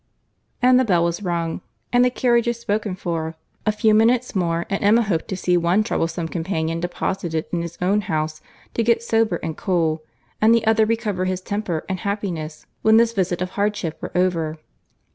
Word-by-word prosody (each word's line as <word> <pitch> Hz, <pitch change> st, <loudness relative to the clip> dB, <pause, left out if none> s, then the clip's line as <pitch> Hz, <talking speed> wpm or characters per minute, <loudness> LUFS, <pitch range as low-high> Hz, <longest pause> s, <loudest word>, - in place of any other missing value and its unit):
And 255 Hz, 0 st, +6 dB
the -, -, +4 dB
bell 180 Hz, -7 st, +2 dB
was 170 Hz, +2 st, -1 dB
rung, 170 Hz, -3 st, -2 dB, 0.3 s
and 245 Hz, 0 st, +5 dB
the 250 Hz, -, +4 dB
carriages 235 Hz, -1 st, +1 dB
spoken 210 Hz, -3 st, -2 dB
for. 165 Hz, -3 st, -3 dB, 0.3 s
A -, -, +5 dB
few 215 Hz, +1 st, +2 dB
minutes 235 Hz, +2 st, +3 dB
more, 170 Hz, -2 st, 0 dB
and 195 Hz, -, -2 dB
Emma 220 Hz, +4 st, +5 dB
hoped 180 Hz, -7 st, -1 dB
to 190 Hz, -, -4 dB
see 180 Hz, -1 st, +1 dB
one 175 Hz, +5 st, +2 dB
troublesome 165 Hz, -4 st, -1 dB
companion 165 Hz, -1 st, -2 dB
deposited 175 Hz, -2 st, -2 dB
in 170 Hz, -, 0 dB
his 170 Hz, 0 st, -6 dB
own 200 Hz, +3 st, +2 dB
house, 155 Hz, -3 st, -2 dB, 0.3 s
to -, -, 0 dB
get 230 Hz, 0 st, +2 dB
sober 225 Hz, -5 st, +2 dB
and 160 Hz, -1 st, -3 dB
cool, 165 Hz, -4 st, 0 dB, 0.4 s
and 225 Hz, +2 st, +6 dB
the 230 Hz, -1 st, +1 dB
other 220 Hz, 0 st, +4 dB
recover 215 Hz, -5 st, -1 dB
his 185 Hz, 0 st, -2 dB
temper 195 Hz, -5 st, -3 dB
and 190 Hz, -1 st, -3 dB
happiness 175 Hz, -7 st, -4 dB, 0.2 s
when 220 Hz, 0 st, +5 dB
this 230 Hz, 0 st, +4 dB
visit 180 Hz, -3 st, 0 dB
of 180 Hz, -, -5 dB
hardship 200 Hz, -6 st, -2 dB
were -, -, -5 dB
over. 165 Hz, -4 st, 0 dB
185 Hz, 185 wpm, -22 LUFS, 170-220 Hz, 0.4 s, And